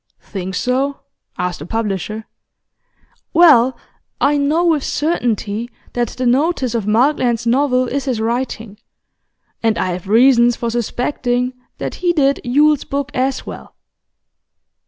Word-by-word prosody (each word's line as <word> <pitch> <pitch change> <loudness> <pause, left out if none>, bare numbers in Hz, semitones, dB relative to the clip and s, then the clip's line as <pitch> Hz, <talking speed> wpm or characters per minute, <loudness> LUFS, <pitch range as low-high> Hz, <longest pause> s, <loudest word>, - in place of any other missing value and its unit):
'Think 190 -2 -6
so?' 265 +6 -1 0.4
asked 180 -1 -2
the 150 - -7
publisher. 215 0 -3 1.1
'Well, 265 -8 +6 0.4
I 290 - +3
know 295 +4 +1
with 315 -5 +2
certainty 240 - -1 0.2
that 240 -1 0
the 255 +4 -4
notice 260 0 +1
of 225 -4 -2
Markland's 240 0 +2
novel 255 +1 +2
is 275 +3 -2
his 255 -5 -1
writing, 225 -2 -3 0.8
and 225 -1 +1
I 185 - -1
have 180 +1 -6
reasons 240 +2 +5
for 235 0 -3
suspecting 245 +1 -1 0.2
that - - -4
he 350 -1 +2
did 280 -3 +2
Yule's 290 +3 +3
book 280 +1 -3
as 260 0 -1
well. - - -10
245 Hz, 130 wpm, -18 LUFS, 225-280 Hz, 1.1 s, Well